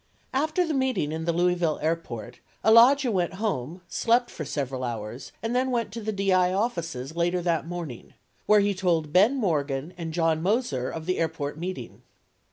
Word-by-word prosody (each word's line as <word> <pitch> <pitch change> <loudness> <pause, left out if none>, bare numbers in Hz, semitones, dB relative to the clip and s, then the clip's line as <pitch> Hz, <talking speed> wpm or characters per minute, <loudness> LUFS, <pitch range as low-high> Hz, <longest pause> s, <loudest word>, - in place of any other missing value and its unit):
After 310 +6 +1
the 320 - -2
meeting 260 - 0
in 160 +1 -3
the 170 - +2
Louisville 175 -2 +1
Airport, 125 -8 -3 0.3
Alagia 240 +4 +6
went 180 -4 0
home, 180 - -3
slept 240 +6 +1
for 155 - -6
several 135 -3 -3
hours 115 +1 -5
and 230 +2 -1
then 260 +1 +2
went 235 -4 -1
to 230 +2 -6
the 215 0 -2
DI 190 -3 +2
offices 170 - -2
later 175 +1 +1
that 170 -2 0
morning, 170 -8 -7 0.3
where 210 -1 +6
he 200 0 +2
told 170 -5 0
Ben 210 +9 +5
Morgan 155 - -1
and 165 -1 -4
John 165 -1 +1
Moser 185 - 0
of 160 -1 -6
the 185 +1 -1
airport 160 -2 -2
meeting. 185 +2 -6
175 Hz, 175 wpm, -26 LUFS, 155-215 Hz, 0.3 s, Alagia